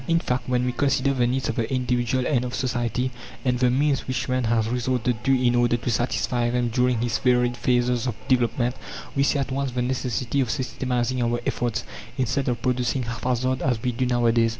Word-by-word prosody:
In 165 - +3
fact, 125 -6 -2
when 125 0 +1
we 125 - +1
consider 135 +1 +1
the 125 -2 +2
needs 130 +2 -1
of 115 - -3
the 115 +1 -1
individual 125 0 0
and 125 -4 +1
of 125 0 -4
society, 125 0 -1 0.3
and 125 -1 +1
the 125 -1 +4
means 140 +2 +1
which 130 -1 -2
man 130 -1 0
has 110 -1 +1
resorted 125 -1 -1
to 135 -1 +3
in 125 -1 +3
order 120 0 +3
to 120 +1 -2
satisfy 120 +1 0
them 120 0 0
during 125 0 +1
his 120 -1 0
varied 125 -1 +2
phases 120 0 +1
of 120 - -2
development, 120 0 +1 0.4
we 140 - +2
see 140 +1 +2
at 140 -1 -2
once 135 0 -1
the 125 - -1
necessity 125 +1 -1
of 125 - -1
systematizing 125 0 -1
our 120 0 +1
efforts, 115 -1 -1 0.3
instead 130 +2 0
of 120 -2 -1
producing 125 0 0
haphazard 125 +2 -1
as 125 -4 +1
we 125 - +1
do 125 +2 -1
nowadays. 120 -2 +3
125 Hz, 205 wpm, -24 LUFS, 120-130 Hz, 0.4 s, the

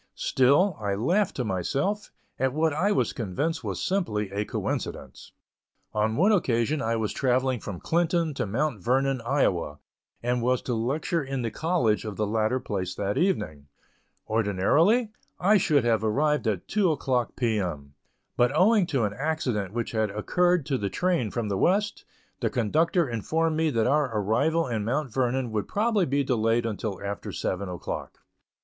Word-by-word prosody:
Still, 145 +8 +3
I 100 -2 -1
laughed 175 - +1
to 130 - -1
myself, 135 - -1 0.3
at 130 0 +1
what 155 0 +1
I 180 +8 +1
was 205 - +1
convinced 145 - -2
was - - -3
simply 105 - -1
a 100 +1 -2
coincidence. - - -5 0.6
On 110 +1 +1
one 190 - +4
occasion 140 - +1
I 115 -3 0
was 110 -2 -2
travelling 130 -1 +1
from 100 -5 -6
Clinton 170 -1 +1
to 135 - -2
Mount 120 -1 -1
Vernon, 135 +1 +1
Iowa, 95 - 0 0.5
and 120 0 0
was 125 +1 +1
to 125 - -2
lecture 145 - -1
in 135 -2 -3
the 115 - -2
college 155 -10 +1
of 105 -2 -5
the 105 - 0
latter 110 +4 0
place 95 -6 -4
that 100 0 -2
evening. 80 - -1 0.6
Ordinarily, 130 - +2 0.3
I 205 +4 +5
should 150 -7 +2
have 115 -2 +2
arrived 145 +5 +1
at 100 -5 -1
two 195 -5 +2
o'clock 130 -5 -1
P. 115 -4 0
M.; 75 -7 -4 0.4
but 120 +1 +3
owing 200 +2 +4
to 135 -8 0
an 105 -1 -1
accident 125 - -2
which 115 +1 -3
had 110 -2 0
occurred 175 - +1
to 135 -3 -1
the 100 - -1
train 175 - 0
from 115 +1 -3
the 100 -2 -1
West, 205 +3 +1 0.3
the - - 0
conductor 160 - +1
informed 155 +8 0
me 160 0 +2
that 115 -6 +1
our 145 +1 +2
arrival 145 +11 +1
in 110 -4 -2
Mount 130 +2 -2
Vernon 130 -1 0
would 105 -2 -2
probably 210 -3 +1
be 140 +1 +1
delayed 115 -2 +1
until 105 -3 -3
after 100 0 -4
seven 95 +1 -3
o'clock. 90 -1 -6
125 Hz, 170 wpm, -26 LUFS, 110-160 Hz, 0.6 s, I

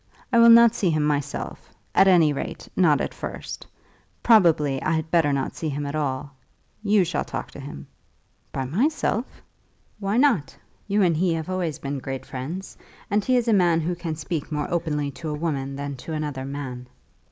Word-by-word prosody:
I 235 - +6
will 230 0 +8
not 235 0 +8
see 190 - 0
him 155 -2 +1
myself; 145 -1 -3 0.2
at 195 - +5
any 165 -5 +5
rate, 140 - -6
not 155 -6 +4
at - - -3
first. - - -7 0.6
Probably 160 - +4
I 155 - 0
had 160 0 -2
better 165 -4 +3
not 140 -1 -2
see 160 - -3
him 145 0 -3
at 140 - -4
all. 140 -2 -3 0.5
You 205 -2 +3
shall 180 +1 -1
talk - - -6
to - - -11
him." 135 - -8 0.7
"By 135 - -3
myself!" 240 - -1 0.6
"Why 200 +2 -1
not? 210 - +2 0.3
You 205 0 +2
and 170 -3 +3
he 175 0 +2
have 160 +3 -4
always 175 -5 -2
been 140 0 -4
great 135 0 -5
friends, 150 +9 -6 0.3
and 205 0 +2
he 255 +4 +2
is 240 -1 0
a 230 - +4
man 175 -4 +3
who 170 +3 -1
can 170 -2 -4
speak 160 -1 -4
more 150 -1 -1
openly 150 -4 -1
to 155 +3 -6
a 150 - -2
woman 140 -4 -2
than 140 0 -4
to 160 +6 -7
another 145 -4 -3
man." 135 -3 -6
160 Hz, 190 wpm, -24 LUFS, 140-185 Hz, 0.7 s, will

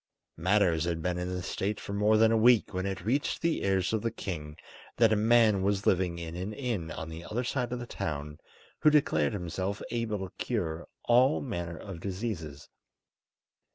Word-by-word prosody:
Matters 85 -2 +2
had 85 -2 -2
been 90 0 -1
in 90 0 -3
this 90 -1 -4
state 100 +1 -2
for 100 - -6
more 105 +2 +3
than 110 +1 +5
a - - +4
week 115 -1 +4
when 95 +1 -1
it 95 0 -4
reached 135 +6 0
the 165 -1 +1
ears 95 0 +1
of 110 - +1
the 115 - 0
king 75 -8 -6 0.4
that 115 -2 +5
a - - +4
man 110 -2 +4
was 100 +1 0
living 90 -2 +2
in 85 -1 -6
an 95 +4 -4
inn 110 -10 -3
on 80 - -6
the 80 +1 -8
other 120 +7 -3
side 125 -1 -2
of 125 - -2
the 120 - -6
town 75 -7 -5 0.4
who 155 - +6
declared 80 - +2
himself 95 +2 -3
able 115 -3 -1
to - - -20
cure 85 -9 -2 0.2
all 125 +4 +4
manner 85 -9 -4
of 95 -2 -8
diseases. 90 -7 -5
100 Hz, 190 wpm, -29 LUFS, 85-115 Hz, 0.4 s, who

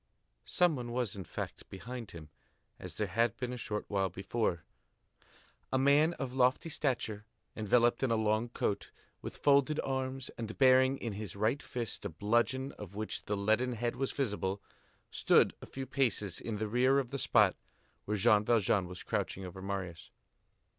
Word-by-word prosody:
Some 175 -3 +3
one 120 -2 -5
was, 120 -3 -1
in 95 - -5
fact, - - -6
behind 115 +3 -7
him, 80 -3 -10 0.5
as - - -8
there 105 - 0
had 115 +5 +1
been 125 -1 -3
a - - -3
short 105 -3 -4
while 95 -2 0
before. 95 -1 -2 1.1
A 130 - +2
man 145 +5 +4
of 130 -2 -4
lofty 130 +5 +2
stature, 115 -8 -2 0.3
enveloped 120 +3 +3
in 135 - +2
a 115 - +3
long 110 +1 +1
coat, 105 -3 -2 0.3
with - - -7
folded 140 +1 +3
arms, 130 -1 -3
and 110 -1 -5
bearing 130 0 +5
in 115 -5 -4
his 100 -3 -6
right 110 +8 +1
fist 120 -3 -5
a - - -3
bludgeon 120 - 0
of 100 -2 -9
which 110 +1 -4
the 105 - -1
leaden 110 +5 +2
head 120 +1 -2
was 135 +1 -1
visible, 105 -7 -1 0.5
stood - - +4
a - - -9
few 135 0 -6
paces 120 -8 0
in 110 -2 -3
the 110 +1 -2
rear 125 +5 +3
of 130 -3 -1
the 140 - -3
spot - - +4 0.5
where 105 +1 -1
Jean 105 0 +5
Valjean 105 -4 +2
was 90 0 -8
crouching 95 - -2
over 90 +1 -8
Marius. 95 -4 -5
115 Hz, 175 wpm, -32 LUFS, 100-130 Hz, 1.1 s, bearing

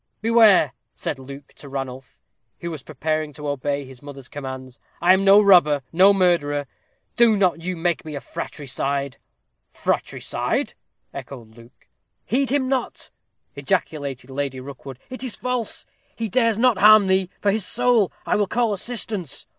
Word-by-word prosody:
"Beware!" 220 - +5 0.2
said 135 - -4
Luke 140 +1 -11
to 140 - -10
Ranulph, 135 -2 -6 0.4
who 170 - -4
was 155 -4 -7
preparing 155 +2 -3
to 150 +1 -7
obey 145 0 -2
his 130 -1 -14
mother's 140 -3 -10
commands; 130 -2 -8 0.2
"I 175 +2 +5
am 190 +1 +2
no 195 +1 +7
robber 175 -9 +5
no 190 +4 +6
murderer. 170 -7 +1 0.5
Do 230 -3 +5
not 180 -4 +1
you 180 +1 -4
make 170 0 -1
me 155 -1 -7
a - - -3
fratricide." 140 -1 -4 0.5
"Fratricide!" - - -2 0.4
echoed 115 -5 -10
Ranulph. 115 +1 -16 0.5
"Heed 265 +4 0
him 270 -1 +1
not," 260 -2 -3 0.4
ejaculated 140 -4 -3
Lady 135 -1 -3
Rookwood. 135 0 -9
"It 255 0 -6
is 250 -4 -1
false 250 -3 -3 0.3
he 230 - -3
dares 230 0 +1
not 240 -4 +3
harm 215 +1 +7
thee, 190 -1 +1
for 200 - +2
his 215 0 0
soul. 235 0 +2
I - - +1
will 205 -1 +1
call 235 +1 0
assistance." 205 - -4
165 Hz, 155 wpm, -22 LUFS, 140-210 Hz, 0.5 s, no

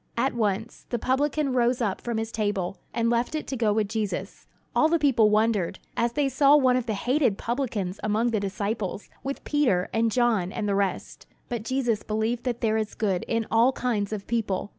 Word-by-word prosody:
At 265 +3 +1
once, 220 -1 -2
the 240 - -1
publican 275 +3 0
rose 245 0 +2
up 210 -6 -1
from 235 -2 -3
his 225 0 -3
table, 205 -4 -2
and 230 -1 0
left 235 +5 +1
it 310 - -3
to 270 - -4
go 225 -4 +2
with 210 0 +1
Jesus. 215 -2 -4 0.3
All 310 - +4
the 335 - +3
people 260 -8 +4
wondered, 210 -4 +1 0.2
as 235 0 0
they 290 0 +1
saw 275 +2 +5
one 260 -3 +4
of 250 -1 -1
the 220 - -1
hated 245 0 +1
publicans 225 -7 -2
among 215 +3 +1
the 220 - +1
disciples, 200 0 -3
with 275 +1 -4
Peter, 245 -12 +1
and 225 0 +2
John, 220 -7 +2
and 210 - -3
the 200 - +1
rest. 195 -1 -2 0.2
But 240 -3 -2
Jesus 240 -2 0
believed 220 +3 -2
that 240 -2 -2
there 220 -2 +2
is 215 -1 -3
good 195 -5 0
in 230 -1 0
all 235 +4 +4
kinds 215 -6 -1
of 205 -2 -4
people. 205 -4 -1
230 Hz, 205 wpm, -26 LUFS, 210-250 Hz, 0.3 s, saw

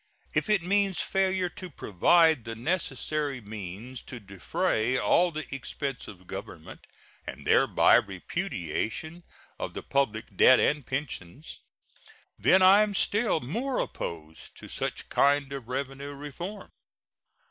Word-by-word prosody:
If - - 0
it 210 -5 +3
means 195 0 +1
failure 190 -1 +1
to 185 +1 -9
provide 160 - +3
the 115 0 -6
necessary 150 0 -2
means 105 +3 -8
to 125 - -9
defray 110 +4 -1
all 180 +6 +3
the 155 -1 -5
expenses 135 0 -5
of 95 -3 -12
Government, - - -9 0.4
and - - -8
thereby - - +5
repudiation 110 - -3 0.4
of - - -5
the - - -5
public 115 -6 -1
debt 130 - +7
and 150 -1 +2
pensions, 130 - -5 0.8
then 190 +1 +5
I 195 +3 +8
am 210 -1 0
still 210 -5 +1
more 245 - -2
opposed 80 -1 -6
to - - -10
such - - -4
kind 140 0 +2
of 135 -4 -7
revenue 135 +2 -4
reform. 170 +8 -7
140 Hz, 125 wpm, -28 LUFS, 115-180 Hz, 0.8 s, I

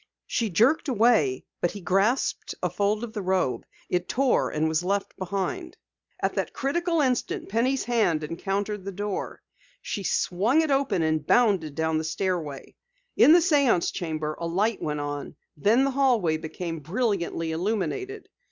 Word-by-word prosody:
She 230 -2 -1
jerked 235 - +3
away, 220 - +2 0.2
but 175 - +2
he 205 - -8
grasped 195 +7 0
a - - 0
fold 210 +2 0
of 225 -2 -6
the 210 - -3
robe. 185 -7 0 0.2
It 180 0 -1
tore 265 0 +2
and 155 +1 0
was 160 +2 0
left 200 +2 -1
behind. 200 - -4 0.4
At - - 0
that - - -2
critical 335 +4 0
instant, 255 -7 -1
Penny's 250 +5 +1
hand 210 -10 +1
encountered 195 +5 -3
the 195 - -5
door. 200 +1 -4 0.4
She 205 - -4
swung 205 - +1
it 315 -2 -1
open, 270 -11 +1
and 155 -1 0
bounded 195 -11 +3
down 160 -1 0
the - - -3
stairway. 160 -4 -3 0.4
In - - +7
the - - +8
séance 285 - +3
chamber 155 -4 -3
a 170 - -2
light 205 +6 0
went 150 -1 -2
on, 145 +1 -5 0.2
then 215 - +3
the 275 - +1
hallway 240 - +2
became 165 +1 -5
brilliantly 170 - -1
illuminated. 210 - -2
195 Hz, 160 wpm, -26 LUFS, 165-240 Hz, 0.4 s, the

